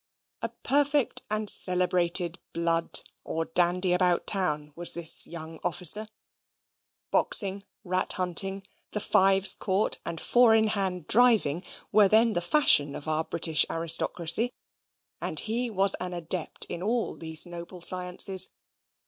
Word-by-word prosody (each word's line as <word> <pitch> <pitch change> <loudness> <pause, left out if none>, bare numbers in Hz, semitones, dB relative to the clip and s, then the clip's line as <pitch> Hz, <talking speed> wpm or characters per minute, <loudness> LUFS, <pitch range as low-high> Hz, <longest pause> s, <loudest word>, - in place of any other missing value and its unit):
A - - -4
perfect 285 -1 0
and 215 0 -4
celebrated 180 -2 +1
"blood," 165 0 0 0.2
or 165 0 -5
dandy 180 +2 0
about 180 -1 -1
town, 150 -7 -3
was 175 0 0
this 170 -1 +4
young 160 -1 -10
officer. 190 +5 +3 1.0
Boxing, 200 -1 +2 0.2
rat 185 -1 -2
hunting, 190 +2 -2 0.3
the 210 - -2
fives 195 -1 +3
court, 195 +2 -2
and 165 - -7
four 240 +2 +2
in 220 -1 +1
hand 190 -5 -4
driving 215 -9 +1 0.3
were 205 -1 +4
then 220 +3 +3
the 175 - -2
fashion 170 - +2
of 145 - -9
our 155 0 -2
British 160 -1 0
aristocracy; 170 +6 +1 0.7
and - - -3
he 235 +3 -4
was 195 -2 +1
an 180 0 -6
adept 170 0 -3
in 170 - -8
all 225 +4 -3
these 160 0 +3
noble 175 +1 -10
sciences. 180 +1 +4
180 Hz, 130 wpm, -25 LUFS, 170-205 Hz, 1.0 s, this